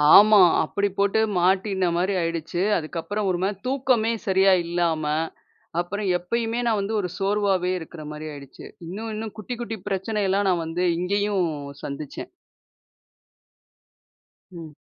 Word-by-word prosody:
ஆமா. 210 0 +8 0.2
அப்பிடி 200 0 -1
போட்டு 200 +2 +2 0.2
மாட்டினமாரி 185 0 +1
ஆயிடுச்சு. 165 +1 -2 0.2
அதுக்கப்புறம் 175 +6 -3
ஒருமாரி 185 +3 0
தூக்கமே 255 -4 +2 0.2
சரியா 190 0 +5
இல்லாம, 170 -2 0 0.8
அப்புறம் 200 +4 -2
எப்பயுமே 230 +6 -2
நான் 220 -3 +2
வந்து 200 +3 -3
ஒரு 180 - -3
சோர்வாவே 195 -2 +1
இருக்கிறமாரி 155 -2 -8
ஆயிடுச்சு. 140 -2 -11 0.2
இன்னும் 215 +6 -5
இன்னும் 220 0 -6
குட்டி 245 +4 -5
குட்டி 225 -2 -4
பிரச்சனைலாம் 195 0 0
நான் 170 -2 +1
வந்து 165 +3 -2 0.2
இங்கேயும் 200 0 +1 0.4
சந்திச்சேன். 140 0 -6 2.2
ம். 165 -4 -9
190 Hz, 115 wpm, -24 LUFS, 175-210 Hz, 2.2 s, ஆமா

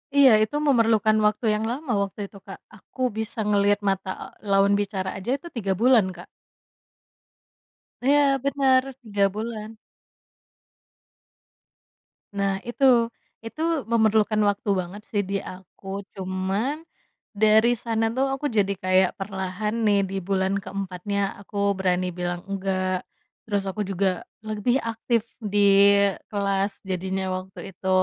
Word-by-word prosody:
Iya, 275 -3 +7
itu 215 +6 -3
memerlukan 225 -4 +4
waktu 210 +2 +1
yang 215 - -2
lama 275 +1 -4
waktu 195 +1 -7
itu, 200 - -15
Kak. - - -9 0.2
Aku 260 - -12 0.2
bisa 220 +1 -4
ngelihat 205 0 +3
mata 195 -2 -1 0.3
lawan 200 0 +3
bicara 200 -2 -2
aja 190 +5 -7
itu 345 - -11
3 200 -5 -1
bulan, 240 -3 +5
Kak. 175 -1 -12 1.8
Iya 290 +2 +5 0.2
benar, 270 -2 +3 0.2
3 205 -2 0
bulan. 220 0 -5 2.7
Nah 195 -1 0
itu, 240 -1 +3 0.3
itu 225 +7 -7 0.3
memerlukan 220 -1 +3
waktu 205 +1 -3
banget 185 +4 -6
sih 205 - 0
di 200 - -1 0.2
aku 190 +1 -15 0.3
cuman, 190 +7 -2 0.6
dari 220 +2 +4
sana 225 -1 0
tuh 270 +1 +2
aku 270 - -7
jadi 200 -1 +2
kayak 185 0 +3
perlahan 195 +2 -3
nih 205 -1 +4
di - - -5
bulan 195 0 +1
ke-4nya, 195 0 -4 0.2
aku 205 +1 -12 0.2
berani 185 -1 +1
bilang 175 0 -3
enggak, 185 -1 -1 0.4
terus 205 -2 0
aku 210 - -6
juga 195 +1 0 0.4
lebih 215 +3 0
aktif 225 0 0 0.2
di 205 -3 -2 0.7
kelas 200 -1 0 0.2
jadinya 190 +1 -2
waktu 185 +1 -9
itu, 190 +1 -6
205 Hz, 125 wpm, -24 LUFS, 190-225 Hz, 2.7 s, Iya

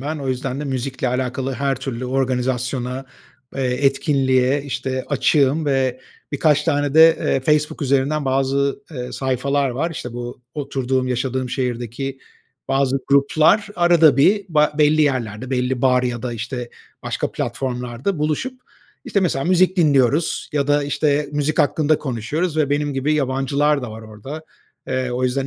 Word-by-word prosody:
ben. 150 +3 -4
O 135 -2 -4
yüzden 130 +1 -2
de - - -4
müzikle 130 -1 -2
alakalı 130 +1 -2
her 135 +1 0
türlü 130 -1 -5
organizasyona, 125 0 -1 0.5
eee, 135 - -1 0.2
etkinliğe, 135 -1 +2
işte, 130 -2 -3
açığım 145 +1 +2
ve 130 -2 0 0.3
birkaç 150 0 +2
tane 145 -1 0
de, 160 +1 +7
eee, 135 - +1
Facebook 150 +2 0
üzerinden 140 +2 +1
bazı, 135 +5 0
eee, 125 -5 -6
sayfalar 135 +1 0
var. 150 +8 -2
İşte 125 -7 -6
bu 120 +1 -7
oturduğum, 130 -3 -1
yaşadığım 130 +1 -2
şehirdeki 125 +1 -3 0.5
bazı 135 0 +1
gruplar 155 +8 +3
arada 170 -5 +5
bir 195 +9 +4
ba 150 -2 +3
belli 155 +1 +4
yerlerde 125 -4 -1
belli 125 -1 -1
bar 125 -1 +4
ya 120 -2 -2
da 125 -2 -3
işte 120 +2 -5 0.3
başka - - -2
platformlarda 125 +6 -3
buluşup, 205 - -2 0.4
işte, 200 - 0
mesela 150 -7 0
müzik 185 +1 +3
dinliyoruz 145 -2 +2
ya 145 -2 0
da, 145 0 +2
işte, 145 0 0
müzik 150 +1 -1
hakkında 155 +1 +2
konuşuyoruz 150 +6 -2
ve 150 -3 +1
benim 145 0 0
gibi 135 +3 0
yabancılar 140 +1 +1
da 120 - -5
var 110 +1 -9
orada. 110 +9 -9 0.5
Eee, 130 -1 -1
o 125 +1 -1
yüzden 135 +2 0
135 Hz, 150 wpm, -20 LUFS, 125-150 Hz, 0.5 s, de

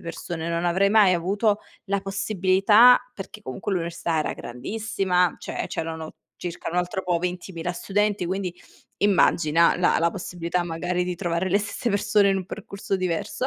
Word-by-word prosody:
persone, 170 0 -5
non 170 +1 -1
avrei 190 +3 +3
mai 210 -3 +6
avuto 200 +5 +1 0.3
la 200 0 0
possibilità" 195 +4 +4 0.2
Perché 205 +2 -9
comunque 130 +6 -4
l'università 170 -2 -1
era - - -2
grandissima, 180 - -1
cioè - - -4
c'erano 160 -1 -5 0.2
circa 175 -1 -6
un 175 - -4
altro 180 +2 -2
po' 180 -1 +1
20000 180 -1 -4
studenti, 205 +1 0
quindi 185 0 -3 0.4
immagina 170 -5 +3
la 180 - +2
la 170 +1 +2
possibilità 175 -1 -3
magari 175 +2 -2
di 180 0 -3
trovare 175 0 -1
le 200 - +4
stesse 205 +3 -3
persone 205 0 +3
in 195 - +1
un 190 - -3
percorso 200 -1 -4
diverso. 185 +6 -2
180 Hz, 155 wpm, -24 LUFS, 170-200 Hz, 0.4 s, mai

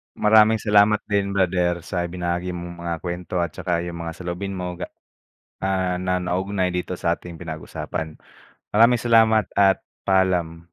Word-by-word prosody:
Maraming 110 +1 +5
salamat 105 0 +4
din 100 -1 0
brother 90 -2 +1
sa 90 -1 -2
ibinahagi 90 0 -3
mong 85 0 -7
mga 85 -1 -2
kwento 90 +1 -5
at 80 - -3
tsaka 85 -2 -2
yung 85 -1 -6
mga 80 0 -5
saloobin 90 +2 -5
mo 90 -1 -5
ga 90 - -4 0.7
ah, 95 -2 0
na 90 0 0
naugnay 95 +1 -1
dito 90 0 -3
sa'ting 85 0 -3
pinag-usapan. 80 -1 -6 0.6
Maraming 115 +2 +5
salamat 110 -3 +4
at 100 -1 +4 0.2
paalam. 90 -4 +1
90 Hz, 145 wpm, -23 LUFS, 85-100 Hz, 0.7 s, Maraming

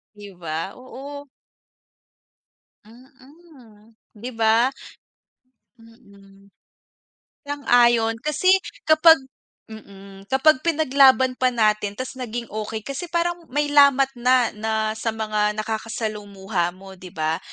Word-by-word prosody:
Di 205 -1 -12
ba? 165 +2 -5
Oo. 275 +3 -10 1.6
Mhm, 255 -2 -20 0.2
'di 245 +4 -7
ba? 225 +3 +3 1.1
Mm. 200 -4 -20 1.0
Sang-ayon 240 -5 +2
kasi 305 +7 +1 0.3
kapag 315 +1 +6 0.6
mm, 195 -2 -13
kapag 265 +1 +3
pinaglaban 270 -5 +3
pa 255 - +3
natin 215 -4 0
ta's 255 +1 -7
naging 240 -1 -5
okey. 215 0 -5
Kasi 280 +6 -6
parang 345 0 -2
may 290 +2 -2
lamat 275 -2 +5
na, 250 -1 +3
na 220 +1 -5 0.2
sa 225 0 -3
mga 215 -1 -1
nakakasalumuha 210 -4 -4
mo, 190 -1 -14
'di 185 - -11
ba? 160 +1 -1
230 Hz, 105 wpm, -22 LUFS, 210-270 Hz, 1.6 s, kapag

